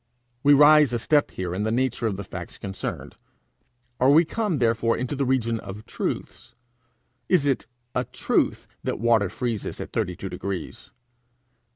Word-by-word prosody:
We 145 +1 +6
rise 150 -2 +7
a - - +2
step 145 +5 +2
here 90 -2 -4
in 95 - -2
the 110 +1 0
nature 120 -1 0
of 105 - -1
the 100 - -5
facts 90 -2 -8
concerned: 95 -1 -6 0.8
are 130 - +4
we 160 +4 +6
come 210 -2 -1
therefore 115 -1 +2
into 125 +3 -3
the 140 0 0
region 115 -3 +1
of 100 +1 -9
truths? - - -5 0.7
Is 175 -6 +3
it 135 -2 0 0.3
a 125 0 0
truth - - 0 0.2
that - - -2
water 115 -4 +3
freezes 115 0 -3
at - - -7
thirty - - -1
two - - -6
degrees? 95 -3 -6
120 Hz, 165 wpm, -25 LUFS, 105-140 Hz, 0.8 s, rise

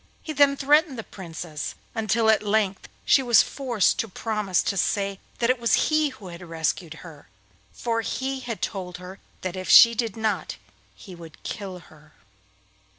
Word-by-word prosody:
He 310 - -5
then 280 -1 +4
threatened 290 0 +3
the 225 - -5
Princess, 165 -6 -7 0.2
until 225 0 +1
at 220 - +2
length 205 -2 -1 0.2
she 275 - +5
was 240 -3 +5
forced 245 -7 0
to 225 - -1
promise 210 -2 -1
to 200 - -1
say 195 +1 -1 0.2
that 235 +1 +2
it 255 - -2
was 235 -1 +2
he 310 -1 +3
who 220 -9 -11
had 170 +1 -10
rescued 165 -1 -3
her, 155 -4 -13 0.4
for 230 -1 -2
he 265 +3 -3 0.2
told 180 -3 -4
her 180 +2 -11 0.2
that 185 0 -4
if 185 0 -6
she 235 0 +9
did 225 -2 -3
not 220 -1 -2 0.4
he 190 - -12
would 165 -2 -13
kill 195 -3 -6
her. 155 -3 -18
210 Hz, 165 wpm, -24 LUFS, 180-235 Hz, 0.4 s, she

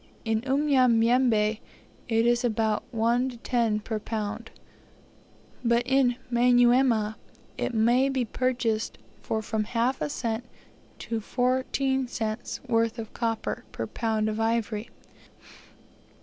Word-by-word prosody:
In 220 -1 +1
Unyanyembe 245 -5 +3 0.5
it 225 -1 +2
is 240 0 +2
about 220 -2 0
$1 240 +2 +1
10 230 -4 +1
per 220 0 -3
pound, 215 -1 -4 1.1
but 235 0 +2
in 260 -1 +3 0.2
Manyuema, 240 -2 +4 0.4
it 240 - -3
may 240 +5 +3
be 260 -2 0
purchased 235 -2 -1 0.2
for 220 -1 -2
from 215 -1 -1
half 240 +4 0
a - - -1
cent 230 -4 -2 0.5
to 230 -1 -3
14 260 +3 0
cent's 220 -1 -4
worth 230 -1 +1
of 220 -2 -7
copper 230 -2 -2
per - - -4
pound 220 -2 -1
of 215 0 -2
ivory. 225 -1 -1
235 Hz, 115 wpm, -27 LUFS, 220-250 Hz, 1.1 s, Manyuema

